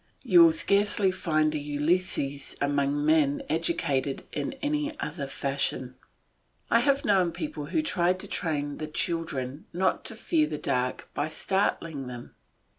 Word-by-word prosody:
You 185 -9 +6
will 165 - +7
scarcely 200 +3 +2
find 155 -4 +1
a 150 - -1
Ulysses 145 -1 -1
among 145 0 +1
men 155 -2 +3
educated 150 -5 0
in 145 -2 -3
any 295 +2 -2
other 140 - -4
fashion. 135 -2 -1 0.8
I - - +6
have 280 -1 +2
known 185 -4 +3
people 155 -3 -5
who 310 - 0
tried 180 - +1
to - - -8
train 145 -3 -2
the 155 - -3
children 150 -4 -3
not 185 +2 +1
to 225 - -2
fear 160 -7 +1
the 150 0 -4
dark 125 -2 -1
by 145 - -1
startling 160 -4 -1
them. 120 -1 -8
155 Hz, 145 wpm, -27 LUFS, 145-185 Hz, 0.8 s, will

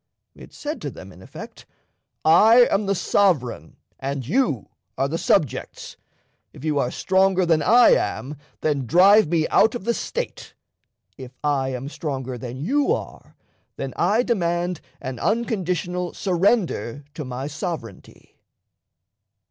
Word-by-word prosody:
It - - -14
said 300 +2 -6
to - - -4
them, - - -11
in - - -15
effect: - - -11 0.6
"I 220 +9 +7
am 195 0 +1
the 200 - +1
sovereign 145 - 0 0.2
and 135 -1 -4
you 165 - 0 0.3
are 135 - +1
the 165 +4 -3
subjects. 145 - -1 0.6
If - - -13
you 150 -2 +1
are 125 - 0
stronger 190 +3 +2
than 165 -2 +2
I 235 +9 +6
am, 140 +4 0 0.3
then 140 -5 -1
drive 195 - +6
me 160 -1 +1
out 220 +3 +4
of 240 - -5
the 235 - +1
State; - - -5 0.6
if 130 -1 -9
I 140 -3 0
am 130 +1 -5
stronger 135 -4 -5
than 120 +1 -7
you 290 - +1
are, - - -5 0.4
then 135 -2 -5
I 210 +7 +2
demand 175 - -1 0.2
an 130 -1 -6
unconditional 180 -6 -1
surrender 175 - 0
to 155 - -6
my 130 0 -5
sovereignty." 150 - -7
170 Hz, 140 wpm, -23 LUFS, 135-200 Hz, 0.6 s, I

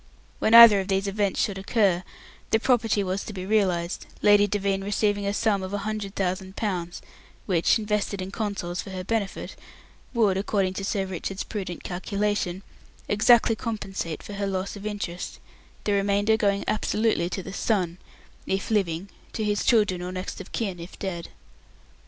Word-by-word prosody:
When 220 - +4
either 230 -3 +11
of 190 - -3
these 195 0 +1
events 200 0 0
should 195 -2 0
occur, 195 -3 +2 0.5
the 225 - +3
property 225 -4 +2
was 190 +1 -2
to 215 - -7
be 185 -1 -5
realized, 185 -4 0 0.2
Lady 205 0 +6
Devine 195 -1 -1
receiving 205 0 0
a - - +1
sum 205 -3 +1
of 190 +2 -4
a 205 - -4
hundred 215 -2 -4
thousand 190 0 -2
pounds, 175 -5 -3 0.4
which, 175 0 +3
invested 210 -2 -1
in 185 +1 -5
Consols 200 -5 -3
for - - -10
her 185 -1 -5
benefit, 210 0 -3 0.6
would, 215 -6 +2
according 195 -1 0
to 195 - -5
Sir 195 0 -1
Richard's 190 +1 -4
prudent 190 -5 -5
calculation 195 0 -2 0.4
exactly 225 +2 +5
compensate 195 -8 -4
for 205 - -8
her 200 0 -2
loss 190 +1 -3
of 205 +1 -6
interest, 190 -4 -5 0.4
the 210 - 0
remainder 200 +2 +2
going 200 -2 +1
absolutely 215 -4 +1
to 190 +1 -4
the 190 - -8
son, 185 -5 0 0.5
if 195 +3 -2
living, 190 -4 0 0.3
to 220 - -2
his 205 -1 0
children 205 -6 +3
or 180 +1 -4
next 185 +1 -5
of 195 - -12
kin 195 -6 -3
if 170 +2 -9
dead. 175 -4 -5
200 Hz, 170 wpm, -26 LUFS, 185-210 Hz, 0.6 s, either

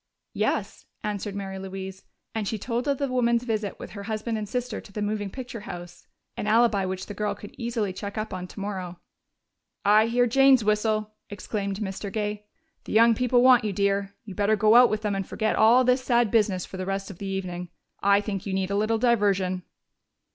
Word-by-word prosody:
"Yes," - - -2 0.2
answered 205 -1 -3
Mary 195 -1 -5
Louise, 190 0 -7 0.3
and 220 -2 -2
she 220 - -2
told 240 +4 -3
of 280 -1 +1
the 280 - -1
woman's 240 -2 +2
visit, 215 -4 -2
with - - -8
her 200 - -7
husband 220 +2 -3
and 210 -2 -4
sister, 245 -1 -3
to - - -15
the 210 - -5
moving 205 -1 -2
picture 250 +1 -7
house 175 -3 -9 0.3
an 210 - -4
alibi 215 -3 +3
which 185 0 -4
the 205 - -7
girl 210 +1 -2
could 205 - -11
easily 230 -5 -2
check 200 +2 -6
up 215 -1 -3
on 180 0 -5
tomorrow. 190 -3 -6 0.9
"I 215 +2 +5
hear 245 +1 +3
Jane's 270 0 +5
whistle!" 215 0 0 0.2
exclaimed 200 0 -4
Mr. 195 0 -4
Gay. 210 0 -3 0.4
"The - - -6
young 230 +1 +6
people 245 +1 +2
want 255 -2 +7
you, 210 -2 -1
dear. 200 0 0
You 200 - -8
better 205 +2 +2
go 215 +1 +4
out 245 +1 +8
with 215 0 -2
them 210 -1 0
and 195 -1 -3
forget 220 -1 -1
all 235 +4 +6
this 250 +1 +2
sad 240 -4 +2
business 205 -5 +2
for 190 - -9
the 185 - -3
rest 195 +1 -3
of 175 - -13
the 200 - -5
evening. 180 -2 -4 0.3
I 200 +1 +4
think 200 -2 -4
you 195 - -2
need 190 0 -1
a - - 0
little 215 +2 +1
diversion." 200 -6 +2
210 Hz, 205 wpm, -26 LUFS, 195-230 Hz, 0.9 s, out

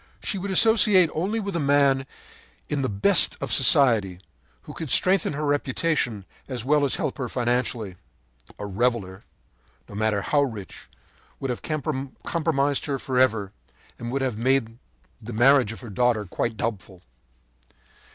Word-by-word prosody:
“She 195 - -2
would 200 +2 -5
associate 195 -4 +5
only 195 +8 -1
with 200 -3 -4
a - - 0
man 140 -2 +2 0.6
in 145 -2 -1
the 130 - -1
best 100 -1 +3
of - - -1
society, 110 -10 +3 0.4
who - - -10
could 160 - -6
strengthen 185 +1 +2
her 150 +2 -3
reputation 140 - -1 0.2
as 125 -4 -5
well 145 +1 +3
as 140 - 0
help - - -3
her 125 -2 -3
financially. 120 -5 -2 0.6
A 105 - -6
reveller, 100 -2 -2 0.6
no - - -13
matter 105 -1 -1
how 145 +5 +2
rich, 110 -9 -6 0.5
would 135 - -3
have 120 - -5
compromised 145 0 -2
her 140 -2 -1
forever, 125 -7 0 0.5
and 120 - -5
would 135 +1 -1
have 125 -5 -2
made 120 -2 0 0.4
the 115 +2 -8
marriage 125 0 +4
of 110 - -10
her 120 -4 -9
daughter 115 0 +1
quite 110 +4 -3
doubtful. 100 -5 -5
130 Hz, 150 wpm, -24 LUFS, 110-145 Hz, 0.6 s, associate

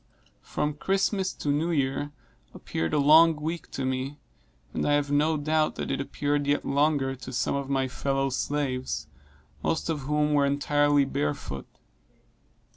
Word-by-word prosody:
From 150 0 -2
Christmas 190 +4 0
to 145 - -4
New 150 +4 +1
Year 145 -2 0 0.4
appeared 80 0 -3
a - - +1
long 160 +3 +7
week 160 +3 -4
to 135 - -3
me, 130 +2 -2 0.6
and - - -1
I 145 - +2
have 145 -1 +1
no 155 +2 +2
doubt 155 +1 +1
that - - -3
it - - -1
appeared 145 +1 -1
yet 145 0 +1
longer 140 -1 +2
to 130 - -8
some 125 - 0
of 140 -1 -3
my 135 -1 +1
fellow 135 +1 -1
slaves, 130 - -2 0.6
most 165 0 -1
of 155 - -2
whom 150 +2 0
were 145 -1 +4
entirely 145 0 +3
barefoot. 75 - -3
145 Hz, 155 wpm, -27 LUFS, 135-150 Hz, 0.6 s, long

